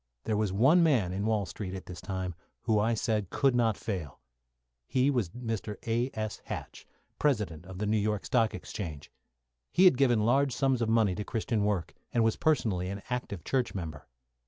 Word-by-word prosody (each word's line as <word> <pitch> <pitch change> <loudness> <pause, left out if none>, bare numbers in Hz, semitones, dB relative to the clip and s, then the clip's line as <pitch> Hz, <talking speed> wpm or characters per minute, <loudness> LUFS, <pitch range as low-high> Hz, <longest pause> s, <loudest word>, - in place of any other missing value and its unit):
There 110 - 0
was 105 -2 +1
one 135 - +5
man 125 - +3
in 100 +3 -1
Wall 110 -3 +1
Street 95 0 -6
at 95 - -7
this 90 -1 -8
time 95 -2 -3 0.3
who 110 -3 +2
I 115 +2 +2
said 105 -4 -1
could 135 -2 +2
not 115 -4 +2
fail. 90 -11 -5 0.7
He 130 +2 +2
was 120 -10 0
Mr. 115 -1 -4
A.S. 115 -2 -2
Hatch, - - -7 0.3
President 105 - 0
of 95 -1 -8
the 105 - -2
New 105 +1 +2
York 105 -1 -1
Stock 115 -3 +2
Exchange. 80 -5 -6 0.6
He 185 - +5
had 180 -9 +7
given 120 -6 +4
large 135 +3 +3
sums 135 -3 +2
of 115 - +1
money 110 -4 +3
to 105 - -3
Christian 110 -1 -1
work, 100 -6 -1 0.2
and 115 - +2
was 110 -1 +2
personally 105 - +1
an 100 +1 -5
active 120 -8 -3
church 130 -5 0
member. 80 -6 -6
110 Hz, 185 wpm, -30 LUFS, 95-120 Hz, 0.7 s, had